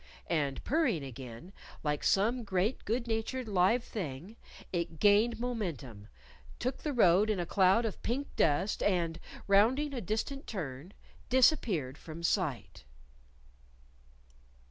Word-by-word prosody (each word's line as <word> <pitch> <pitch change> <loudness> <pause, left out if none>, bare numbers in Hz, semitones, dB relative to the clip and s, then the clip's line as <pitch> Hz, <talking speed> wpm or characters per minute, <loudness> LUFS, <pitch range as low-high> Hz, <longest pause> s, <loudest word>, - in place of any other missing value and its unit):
And 145 -5 -1
purring 295 - +1
again, 130 - -9 0.3
like 150 -1 -1
some 230 +5 +2
great 200 +3 -1
good 235 +3 -1
natured 230 +2 -2
live 200 +4 +3
thing, 180 - -6 0.4
it 170 -2 -2
gained 210 +5 +4
momentum, 165 - -4 0.5
took 255 +2 -2
the 300 - -3
road 210 -4 +4
in 210 -3 0
a 175 - -1
cloud 195 +5 +3
of 215 - -4
pink 270 +5 -3
dust, 160 +7 +1
and, 170 -4 0 0.3
rounding 245 +9 +3
a 250 - -3
distant 225 - -3
turn, 160 - -6 0.4
disappeared 210 - +2
from 165 +1 -9
sight. 155 - -1
195 Hz, 120 wpm, -31 LUFS, 160-235 Hz, 0.5 s, gained